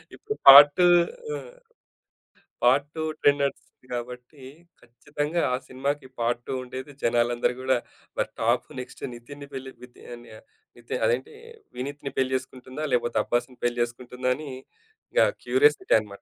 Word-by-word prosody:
ఇప్పుడు 430 0 -5
పార్ట్ 145 +1 +12
2 180 - +6 0.5
ఆ! - - -3 1.3
Part 135 +4 +4
2 160 - -3 0.2
trend 145 0 +4
నడుస్తోంది 135 -2 -5
కాబట్టి, 125 +3 -7 0.4
ఖచ్చితంగా 145 +7 -3
ఆ - - +3
సినిమాకి 135 +1 -3
పార్ట్ 120 +1 0
2 - - -3
ఉండేది 130 +3 -8
జనాలందరూ 120 +1 +1
కూడా 130 0 +2 0.4
మరి - - 0
టాప్ - - +1
నెక్స్ట్ 125 - -9
నితిన్ 140 +5 -11
పెళ్లి 135 0 -7
వితి 125 0 -15 0.8
నితిన్ 120 0 -4
అదేంటి 120 +3 -1 0.4
వినీత్‌ని 140 +2 -5
పెళ్ళి 130 0 +1
చేసుకుంటుందా? 130 +3 -8
లేకపోతే 120 -2 +1
'అబ్బాస్‌'ని 120 +1 -2
పెళ్ళి 120 0 0
చేసుకుంటుందా? 125 +1 -4
అని 150 -2 -8 0.6
ఇంకా - - +4 0.2
క్యూరియసిటీ 390 -1 +3
అనమాట. 100 -2 -11
130 Hz, 135 wpm, -25 LUFS, 120-145 Hz, 1.3 s, పార్ట్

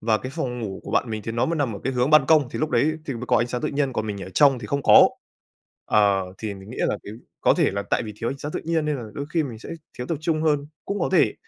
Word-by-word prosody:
và 110 -1 +2
cái 130 - -6
phòng 125 -1 -3
ngủ 100 -4 -5
của - - -8
bạn 120 - +1
mình 110 -1 -4
thì 115 - -4
nó 115 - +1
mới 165 0 -1
nằm 130 -8 -1
ở - - -8
cái 135 - 0
hướng 125 +3 +1
ban 150 -3 +6
công, 150 -4 +4
thì - - -5
lúc 155 0 -1
đấy 145 +5 +2
thì 140 - -3
mới 120 +1 -6
có - - +3
ánh 120 - +1
sáng 125 0 -3
tự - - -1
nhiên, 140 -2 -1
còn 110 -2 -2
mình 100 -2 -4
ở 95 - -8
trong 140 -3 +5
thì 115 - -7
không 140 +5 -1
có. - - +8 0.8
Ờ, 100 -2 +3
thì 105 -2 -4
mình 95 +2 -12
nghĩ 125 - -8
là - - +1
cái 105 - -8 0.3
có - - +4
thể - - +2
là 100 +1 -3
tại - - 0
vì 110 -2 -6
thiếu 115 - -1
sáng 150 +2 -5
tự - - -3
nhiên 165 -1 0
nên 150 -1 0
là 120 - -6
đôi 140 - -4
khi 165 - +3
mình 120 -6 -6
sẽ - - -11 0.3
thiếu 125 - -4
tập 165 -4 -2
trung 155 -1 0
hơn, 145 -2 +1 0.2
cũng 200 0 -3
có - - +1
thể. 155 - +4
125 Hz, 320 wpm, -24 LUFS, 110-150 Hz, 0.8 s, có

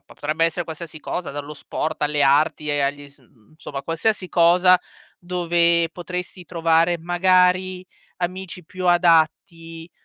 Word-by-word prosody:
potrebbe 155 +3 -1
essere 165 +1 0
qualsiasi 160 -1 -9
cosa, 175 +3 -4
dallo 145 +1 -6
sport 155 +2 -5
alle 150 -1 +1
arti 150 +2 +2
e 145 -1 0
agli 145 +1 -2
s 140 - -23
mhmm, 115 -4 -28
insomma 155 -3 -8
qualsiasi 185 +5 -1
cosa 180 +2 +4 0.4
dove 170 -1 +1
potresti 180 +1 -6
trovare 165 0 +1
magari 180 +1 +2 0.3
amici 180 0 -5
più 185 +2 -6
adatti, 165 -1 +1
170 Hz, 130 wpm, -22 LUFS, 155-180 Hz, 0.4 s, cosa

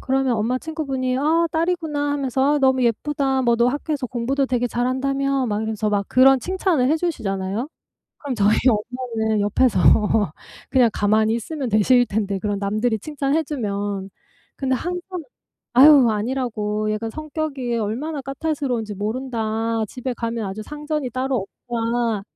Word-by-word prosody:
그러면 265 -2 +1
엄마 235 +4 0
친구분이 270 -5 -2
"아 325 +4 +2
딸이구나." 320 -4 0
하면서 275 +1 +1
"아 - - +1
너무 265 -2 +3
예쁘다. 265 +3 0
뭐 235 -1 +3
너 235 +1 +3
학교에서 285 -1 -2
공부도 255 +4 -1
되게 245 -1 0
잘 245 +1 -1
한다며?" 275 +1 0
막 210 -2 -1
이러면서 220 -1 -2
막 200 -1 +1
그런 265 +1 +6
칭찬을 360 - +1
해 315 - +3
주시잖아요. 215 - -2 0.5
그럼 285 -3 -4
저희 210 0 +3
엄마는 225 -1 0
옆에서 205 0 +2 0.9
그냥 250 -3 +4
가만히 215 +2 +2
있으면 265 +2 -4
되실 245 +4 +4
텐데 200 -2 -1
그런 205 +1 -2
남들이 215 +3 0
칭찬해주면 240 -10 -2 0.5
근데 265 -1 0
항상 355 +3 -5 0.5
"아휴 270 -2 +8
아니라고 215 -2 -2
얘가 225 +2 -3
성격이 295 -4 -3
얼마나 260 +9 -3
까탈스러운지 275 -6 -2
모른다. 225 0 -2
집에 255 +3 -4
가면 230 -1 -3
아주 195 +3 -5
상전이 300 -1 -4
따로 255 -4 -1 0.2
없다. 230 -2 0
250 Hz, 340 characters per minute, -22 LUFS, 220-280 Hz, 0.9 s, 아휴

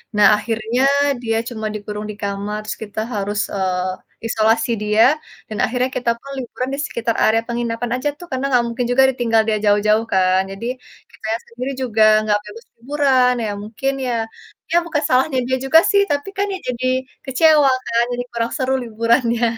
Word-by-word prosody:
Nah, 210 - +6
akhirnya 225 +3 -2 0.4
dia 225 -1 0
cuma 220 -3 -6
dikurung 210 0 -5
di 210 - -10
kamar, 200 +1 -3
terus - - -3
kita 210 0 -6 0.2
harus, 205 +1 -2 0.2
eee, 185 -1 -1 0.3
isolasi 225 +1 +2
dia, 210 +1 +3 0.5
dan 215 - -5
akhirnya 250 +3 -1
kita 240 -2 +1
pun 275 - -13
liburan 255 +1 -4
di 280 - -3
sekitar 235 -4 -2
area 225 +1 +3
penginapan 235 0 -3
aja 295 - +1
tuh 350 - -10
karena 260 +1 -2
nggak 245 -3 +3
mungkin 240 +1 -2
juga 265 +2 +5
ditinggal 230 -3 +2
dia 215 -1 +1
jauh-jauh 210 +2 +3
kan? 185 0 +3
Jadi, 195 +4 -7 0.5
kitanya 220 +1 -3
sendiri 250 +3 -5
juga 225 -4 +2 0.2
nggak 210 -1 +3
bebas 210 +3 -11
liburan, 260 0 +2
ya - - -2
mungkin 225 +6 -2 0.2
ya 245 - 0 0.6
ya, 340 - +4
bukan 325 -3 -1
salahnya 260 +2 +2
dia 260 - +1
juga 320 +4 +7
sih, 400 -1 +5
tapi 285 +6 -1
kan 400 - +1
ya 380 - -3
jadi 250 0 -2 0.4
kecewa 295 +1 +4 0.2
kan? 235 0 +2
Jadi 245 0 -2
kurang 230 0 -1
seru 265 -1 0
liburannya. 230 +1 +1
230 Hz, 180 wpm, -19 LUFS, 215-255 Hz, 0.6 s, juga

